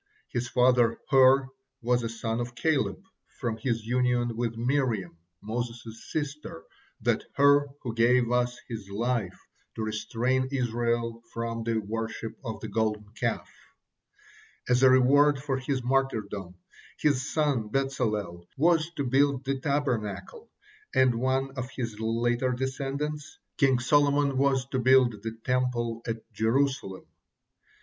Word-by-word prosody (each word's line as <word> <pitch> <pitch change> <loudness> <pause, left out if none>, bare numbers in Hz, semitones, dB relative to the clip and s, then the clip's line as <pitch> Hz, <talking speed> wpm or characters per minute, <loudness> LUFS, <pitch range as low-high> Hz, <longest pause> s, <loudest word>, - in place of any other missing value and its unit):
His 120 0 -2
father 125 -2 +3
Hur 135 0 +6 0.3
was 125 +1 +2
a 115 - -3
son 115 0 -3
of 120 0 -4
Caleb 160 +6 0 0.4
from 120 -5 -2
his 115 -1 -2
union 120 -1 +1
with 115 -1 -2
Miriam, 120 -8 0 0.3
Moses' 115 0 -5
sister, 150 - -4 0.4
that - - +1
Hur 145 +1 +5 0.2
who 120 -4 -3
gave 120 +2 +4 0.4
his 110 -4 -7
life 110 -2 -2 0.4
to 110 - -3
restrain 115 +4 -1
Israel 120 -2 -1
from 115 0 -3
the 115 0 0
worship 110 +1 -4
of 115 -3 -5
the - - -5
Golden 105 -2 -1
Calf. 110 - -2 1.2
As 125 0 +3
a 130 - +7
reward 140 +3 +5
for 135 -1 -2
his 130 -1 -2
martyrdom, 110 -8 -1 0.4
his 140 -2 +1
son 140 -9 0
Bezalel 105 -10 -2
was 160 +1 +3
to 145 - -1
build 135 +1 +2
the 135 0 -1
Tabernacle, 140 - -2 0.5
and 130 -1 +5
one 130 +3 0
of 125 0 -4
his 115 -5 -5
later 120 +3 0
descendants, 140 +3 -4 0.2
King 135 -2 +3
Solomon, 145 +1 +3
was 135 -2 +2
to 130 - -1
build 125 -4 +4
the 115 +1 -5
Temple 125 -2 0
at 115 -1 -3
Jerusalem. 115 -4 0
125 Hz, 130 wpm, -28 LUFS, 115-135 Hz, 1.2 s, a